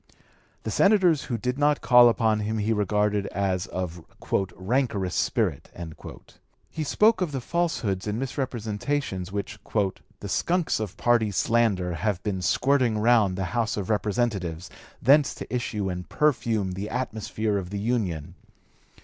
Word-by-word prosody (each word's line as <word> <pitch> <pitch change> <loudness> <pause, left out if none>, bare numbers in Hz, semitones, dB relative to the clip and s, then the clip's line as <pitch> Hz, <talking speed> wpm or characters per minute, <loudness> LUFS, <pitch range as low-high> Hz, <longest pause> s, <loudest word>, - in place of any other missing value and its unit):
The - - -3
senators 185 -7 +4
who 120 - -2
did 125 +4 -2
not 145 0 +2
call 120 -1 +7
upon 110 -2 +1
him 110 +1 -2
he 110 +1 +1
regarded 105 -1 +1
as 95 -2 -1
of 90 -2 -5 0.5
"rancorous 100 -3 -1
spirit." - - 0 1.0
He 160 - -3
spoke 210 +7 +3
of 175 -5 0
the 135 - -2
falsehoods 120 - -1
and 105 +1 -1
misrepresentations 120 -5 -3
which 100 +1 -4 0.6
"the - - -6
skunks 175 -6 0
of 105 -4 -5
party 120 -3 +2
slander... 100 -3 +1
have 100 +1 -2
been... 95 -3 -2
squirting 125 +4 +2
round 105 -4 +3
the 95 0 -2
House 115 -3 0
of 100 0 -2
Representatives, 100 -6 -1 0.3
thence 140 +3 +5
to - - -8
issue 110 -5 -2
and 90 -1 -5
perfume 115 -9 +1
the 95 +3 -5
atmosphere 110 -3 -2
of 90 -2 -7
the 100 - -4
Union." 100 -9 -2
110 Hz, 140 wpm, -26 LUFS, 100-125 Hz, 1.0 s, call